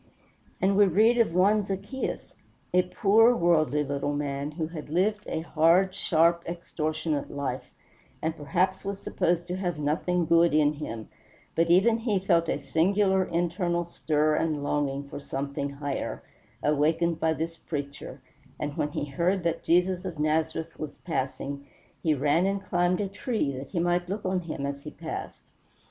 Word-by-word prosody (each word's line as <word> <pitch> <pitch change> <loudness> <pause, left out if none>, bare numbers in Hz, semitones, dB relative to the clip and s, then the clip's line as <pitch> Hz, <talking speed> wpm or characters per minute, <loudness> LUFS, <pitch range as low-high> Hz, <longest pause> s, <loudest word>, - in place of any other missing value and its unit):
And 195 +1 +2
we 205 - +7
read 220 +7 +4
of 215 -8 +2
one 205 +3 +4
Zaccheus, 200 +7 -4 0.4
a 180 - +6
poor 215 +6 +4
worldly 155 - +2
little 145 +1 -2
man, 140 0 -2
who 160 +1 -2
had 155 -2 -8
lived 205 +6 0
a 160 - -2
hard, 170 +4 +3
sharp, 170 0 +3
extortionate 155 -3 -3
life, 140 -1 -3 0.5
and 160 0 -2
perhaps 175 +6 0
was 200 0 -3
supposed 175 -3 0
to 180 +1 -4
have 175 -4 -2
nothing 165 +4 0
good 170 -1 +4
in 150 -1 +4
him; 115 -7 -6 0.5
but 165 0 +2
even 215 +6 +5
he 225 -3 0
felt 170 -3 +2
a - - +1
singular 190 +7 +2
internal 175 0 -1
stir 155 -2 +1
and 150 -2 0
longing 140 -1 -1
for 140 - -7
something 140 0 -3
higher, 140 0 -4 0.4
awakened 160 +3 +2
by 160 0 +2
this 165 +1 -3
preacher, 145 -3 -6 0.4
and 145 -1 -4
when 150 - 0
he - - -2
heard 170 +6 0
that 170 -1 -1
Jesus 180 +1 +2
of 180 -4 -5
Nazareth 160 +2 -1
was 150 -2 -6
passing 140 -2 -4 0.3
he 155 -2 +2
ran 145 +6 +2
and 195 0 -2
climbed 175 +2 +1
a 200 - -1
tree 195 - -2
that 130 +1 -7
he - - -5
might 175 +1 +1
look 200 +1 -4
on 185 0 +1
him 160 -5 -5
as 140 0 -4
he - - -7
passed. - - -7
165 Hz, 165 wpm, -27 LUFS, 150-185 Hz, 0.5 s, we